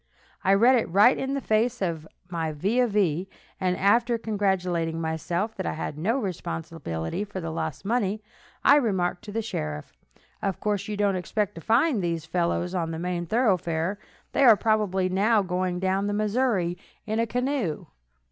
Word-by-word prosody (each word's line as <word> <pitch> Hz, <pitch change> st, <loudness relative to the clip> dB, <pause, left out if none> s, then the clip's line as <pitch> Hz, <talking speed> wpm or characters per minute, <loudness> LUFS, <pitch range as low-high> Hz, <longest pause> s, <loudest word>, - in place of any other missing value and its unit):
I 195 Hz, +1 st, +5 dB
read 245 Hz, +5 st, +5 dB
it 230 Hz, -, -1 dB
right 205 Hz, +8 st, +6 dB
in 270 Hz, +1 st, -2 dB
the 275 Hz, -, -2 dB
face 230 Hz, +2 st, +1 dB
of 165 Hz, -4 st, -2 dB, 0.2 s
my 165 Hz, -3 st, -3 dB
vis 210 Hz, +12 st, +1 dB
a -, -, -1 dB
vis, 190 Hz, -5 st, +1 dB, 0.3 s
and 180 Hz, -2 st, 0 dB
after 235 Hz, +4 st, +3 dB
congratulating 185 Hz, -7 st, -1 dB
myself 170 Hz, +6 st, -2 dB
that 190 Hz, -, -3 dB
I -, -, -1 dB
had 155 Hz, -, -4 dB
no 200 Hz, -, 0 dB
responsibility 165 Hz, -, -4 dB
for 205 Hz, -2 st, -6 dB
the 165 Hz, -2 st, -4 dB
lost 160 Hz, 0 st, -4 dB
money, 215 Hz, -2 st, 0 dB, 0.4 s
I 285 Hz, -, +7 dB
remarked 190 Hz, -9 st, 0 dB
to 210 Hz, -, -7 dB
the 225 Hz, +2 st, -2 dB
sheriff: 75 Hz, -, -5 dB, 0.5 s
"Of 195 Hz, -2 st, -2 dB
course, 210 Hz, -2 st, -1 dB
you 210 Hz, -1 st, -3 dB
don't 200 Hz, -1 st, +2 dB
expect 205 Hz, +3 st, -2 dB
to 165 Hz, -, -9 dB
find 235 Hz, -, +2 dB
these 165 Hz, -2 st, -2 dB
fellows 175 Hz, +1 st, -1 dB
on 170 Hz, -3 st, -1 dB
the 165 Hz, -, -4 dB
main 175 Hz, 0 st, -3 dB
thoroughfare. 185 Hz, -4 st, +1 dB, 0.3 s
They -, -, +2 dB
are 230 Hz, -5 st, +8 dB
probably 210 Hz, -4 st, +1 dB
now 205 Hz, +3 st, +3 dB
going 180 Hz, -1 st, -1 dB
down 190 Hz, +2 st, 0 dB
the 205 Hz, -, -1 dB
Missouri 210 Hz, -5 st, 0 dB, 0.3 s
in 220 Hz, 0 st, -1 dB
a 230 Hz, -, +1 dB
canoe." 250 Hz, -, -1 dB
195 Hz, 175 wpm, -26 LUFS, 170-220 Hz, 0.5 s, are